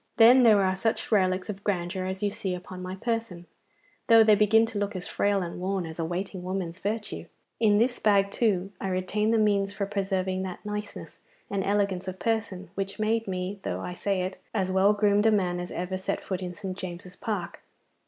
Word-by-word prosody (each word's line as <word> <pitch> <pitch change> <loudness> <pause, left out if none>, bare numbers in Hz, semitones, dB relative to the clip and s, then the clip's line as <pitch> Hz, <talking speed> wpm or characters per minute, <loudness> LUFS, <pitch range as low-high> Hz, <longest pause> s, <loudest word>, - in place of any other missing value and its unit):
Then 240 +3 +8
there 215 -4 +6
are 190 0 +1
such 220 +5 -1
relics 185 -3 +2
of 200 -1 -6
grandeur 185 -1 -1
as 190 +1 -4
you 205 - +1
see 200 -3 -3
upon 180 +1 -8
my 185 +1 -5
person, 225 -5 -3 0.6
though 225 -2 +8
they 215 -1 +6
begin 215 +2 +5
to 225 -2 -4
look 205 0 -2
as 180 0 -4
frail 200 -2 +1
and 170 0 -6
worn 190 0 -1
as 160 +1 -8
a 165 - 0
waiting 185 +2 -4
woman's 185 -1 -4
virtue. 210 +2 -4 0.3
In 210 -2 +4
this 240 +3 +2
bag, 200 -2 +3
too, 195 -5 +1
I 195 - -2
retain 190 +3 0
the 225 - +3
means 200 -2 +2
for 200 0 -2
preserving 190 -2 -1
that 190 +1 -6
niceness 210 0 -6 0.3
and 200 -1 0
elegance 195 -2 0
of 185 0 -4
person 220 -5 -2
which 195 0 -4
made 225 +1 0
me, 185 +1 -3
though - - -3
I 180 - -5
say 190 0 -1
it, 185 0 -5 0.2
as 190 -3 0
well 190 +2 +4
groomed 205 +1 +3
a - - +5
man 180 -4 +1
as 175 - -5
ever 180 +2 -3
set 190 - -2
foot 190 -1 -4
in 180 -1 -5
St. 190 0 -5
James's 180 0 -7
Park. 210 -7 -4
195 Hz, 210 wpm, -27 LUFS, 185-210 Hz, 0.6 s, Then